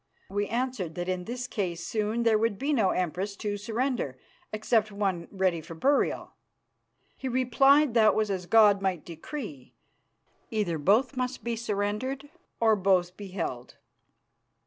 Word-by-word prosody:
We 205 +1 -1
answered 230 -8 -2
that 175 0 -3
in 185 -1 -2
this 245 +2 -4
case 185 -8 -3
soon 220 +2 -1
there 225 -2 +4
would 225 -2 0
be 285 +6 0
no 220 -8 +3
Empress 185 +3 -2
to 205 0 -3
surrender 220 - -2 0.3
except 215 0 +1
one 195 -4 -2
ready 185 -4 0
for 165 +1 -10
burial. 275 - +1 0.8
He 265 - -5
replied 260 +2 +4
that 220 -2 +5
was 215 -2 +1
as 180 -2 -3
God 210 -2 +6
might 185 -5 -1
decree; 165 - -8 0.7
either 195 -7 -1
both 220 - +3
must 255 0 -3
be 235 0 -1
surrendered 230 +6 -3 0.3
or 225 -1 +4
both 185 -2 +2
be 205 0 -8
held." 165 -10 -5
210 Hz, 145 wpm, -28 LUFS, 185-235 Hz, 0.8 s, God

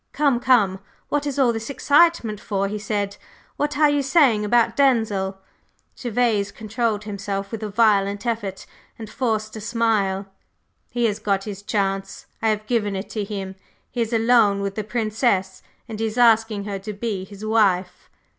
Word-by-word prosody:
"Come, 280 -4 +2
come, 230 -7 +3 0.3
what 290 0 0
is 285 - -3
all 255 -4 +3
this 225 +2 -5
excitement 285 - +3
for?" 200 -2 -1
he 210 +1 -4
said. 205 -1 -2 0.4
"What 295 0 -2
are 300 0 +5
you 290 -1 +2
saying 270 -6 +3
about 230 +2 +2
Denzil?" 220 -8 +1 0.6
Gervase 230 -4 0
controlled 220 -1 -2
himself 200 -1 -4
with 225 -2 -5
a 215 - -3
violent 205 -1 +2
effort 210 -5 -3 0.3
and 225 - -8
forced 215 -1 -2
a - - -7
smile. 215 -4 0 0.6
"He 240 -1 0
has 210 -2 0
got 195 -1 0
his 200 -2 -7
chance, 195 -2 -2 0.2
I 225 - +2
have 215 0 -1
given 215 -4 0
it 190 +2 -5
to 215 - -2
him! 195 -2 -5 0.4
He 245 - -2
is 230 0 -1
alone 225 -3 +3
with 200 0 -2
the 215 - -3
Princess, 215 -3 -1 0.3
and 220 -1 -7
he 225 - 0
is 220 +2 -6
asking 225 -3 +4
her 200 -1 -4
to 210 +2 -6
be 205 -2 -3
his 200 +2 -10
wife!" 195 -5 +1
215 Hz, 175 wpm, -22 LUFS, 200-235 Hz, 0.6 s, are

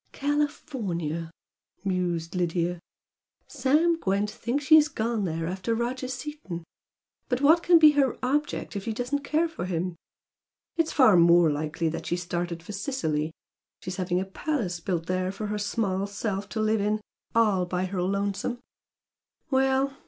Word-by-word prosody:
"California!" 220 - -2 0.6
mused 175 -3 -1
Lydia 175 -1 0 0.7
"Sam 300 +5 +2
Gwent 200 -1 0
thinks 270 +5 -2
she 315 - +5
has 310 -1 +8
gone 225 -6 -1
there 165 -1 -2
after 190 +6 -2
Roger 250 +3 -2
Seaton. 255 - -6 0.7
But 250 0 0
what 320 +4 +6
can 345 0 +6
be 310 -2 +8
her 280 -3 +2
object 285 -2 -1
if 200 - -4
she 225 - -1
doesn't 250 +5 -2
care 320 +4 +1
for 320 - -5
him? 180 0 -2 0.8
It's 330 -1 +1
far 220 -10 +6
more 170 -1 +6
likely 155 +2 -1
she's 175 +1 -2
started 175 -1 -3
for 185 - -8
Sicily 195 - -2 0.5
she's 185 +1 -5
having 180 -1 0
a 190 - -2
palace 195 - -2
built 170 -1 -2
there 185 +1 -1
for 200 +2 -5
her 210 0 -2
small 200 -2 -1
self 200 0 -3
to 220 - -4
live 215 0 +2
in 210 +1 +1 0.4
'all 205 -6 +3
by 180 +1 -1
her 185 -1 -3
lonesome'! 200 +5 -1 0.9
Well! 265 +1 +2
200 Hz, 150 wpm, -27 LUFS, 180-265 Hz, 0.9 s, has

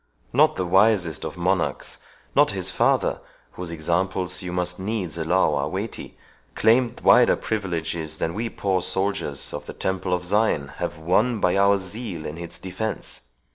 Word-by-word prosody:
Not - - +4
the 95 - -1
wisest 95 -4 +3
of - - -6
monarchs, 90 0 -1 0.4
not - - +5
his - - -2
father, - - +2 0.3
whose 90 -1 -6
examples 90 +3 -1
you 90 -1 -5
must 90 0 -2
needs 95 -4 -2
allow 85 0 +2
are 70 +1 0
weighty, 100 +6 -5 0.4
claimed 120 +1 +3
wider 125 -1 +6
privileges 85 -6 -3
than 80 - -2
we 115 +4 -2
poor 95 -4 0
soldiers 95 -8 -1
of - - -6
the - - -6
Temple 95 -1 -2
of 90 0 0
Zion 100 -8 +1
have - - -3
won 105 +9 +1
by 90 -1 +2
our 100 0 +4
zeal 95 -3 -6
in 80 +3 -6
its 85 -1 -8
defence. 95 +4 -5
90 Hz, 160 wpm, -24 LUFS, 85-100 Hz, 0.4 s, wider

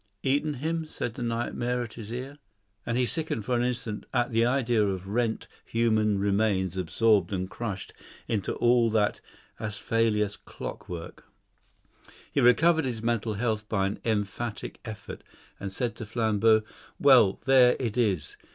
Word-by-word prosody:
"Eaten 145 +2 +1
him?" 160 +4 -2
said 120 -6 -4
the - - -8
nightmare 120 +1 -1
at 115 - -8
his 110 -2 -8
ear; 130 +4 -6 0.5
and 115 - 0
he 125 - +3
sickened 150 - -2
for 125 - 0
an 120 - +1
instant 120 -3 -3
at 120 0 +1
the 115 0 +3
idea 120 -3 +2
of 95 -2 -2
rent, 115 +1 -1 0.2
human 110 -3 +1
remains 100 -2 +1
absorbed 95 +2 +2
and 95 -1 -3
crushed 105 -5 -5 0.3
into 105 -4 -1
all 120 -1 +3
that 105 -2 +1 0.4
acephalous 105 0 0
clockwork. 85 -2 -8 1.1
He - - +1
recovered 160 +6 +5
his 115 -4 -3
mental 115 -2 0
health 110 -1 -2
by 100 -3 +1
an 100 - -3
emphatic 110 +1 -3
effort, 110 -3 -8 0.4
and 100 -1 -5
said 120 +3 -2
to 115 - -6
Flambeau, 110 -1 +3 0.4
"Well, 125 -9 +6
there 130 -2 +6
it 115 -4 -2
is. 100 -11 0
115 Hz, 150 wpm, -27 LUFS, 105-120 Hz, 1.1 s, Well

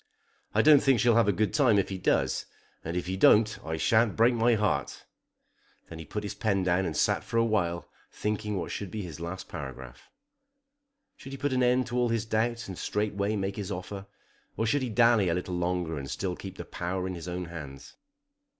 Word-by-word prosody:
I - - +4
don't 150 -2 +7
think 135 -4 +3
she'll 120 +2 +4
have 115 -1 +4
a - - +5
good 105 +2 0
time 125 -8 +4
if 100 - +1
he 95 -1 -4
does, - - +1 0.4
and 85 +2 -3
if 90 - -2
he 95 +1 -3
don't 110 +3 +4
I 80 0 -3
sha'n't 110 +3 +3
break 115 +2 +4
my 115 0 +3
heart." 105 -1 -1 0.8
Then 80 - -9
he 80 - -8
put 105 - -5
his 100 - -4
pen 100 -3 0
down 90 +1 +1
and 80 - -4
sat - - +2
for 115 - -3
a 115 - +4
while 85 -7 -1 0.2
thinking 105 0 -2
what 90 - -3
should 100 - -4
be 105 +2 -5
his 85 -3 -8
last 85 +3 -6
paragraph. 65 -3 -9 1.1
Should 135 - -10
he - - -5
put 140 +1 -1
an 130 - +1
end 125 +1 +3
to 125 0 -4
all 120 -1 +2
his 115 -1 0
doubts 115 +1 -1
and 95 -2 -7
straightway 105 0 -1
make 95 0 -3
his 100 -1 -4
offer, 95 +2 -6 0.5
or 110 - 0
should 140 +5 +1
he 130 - -2
dally 115 -4 +4
a 85 - +1
little 90 0 -3
longer 90 -3 -1
and 70 0 -7
still 90 +4 -3
keep 95 0 -9
the - - -6
power 90 +1 -3
in 95 - -3
his 85 -1 -7
own 90 0 -4
hands? 75 -5 -9
100 Hz, 220 wpm, -28 LUFS, 90-115 Hz, 1.1 s, don't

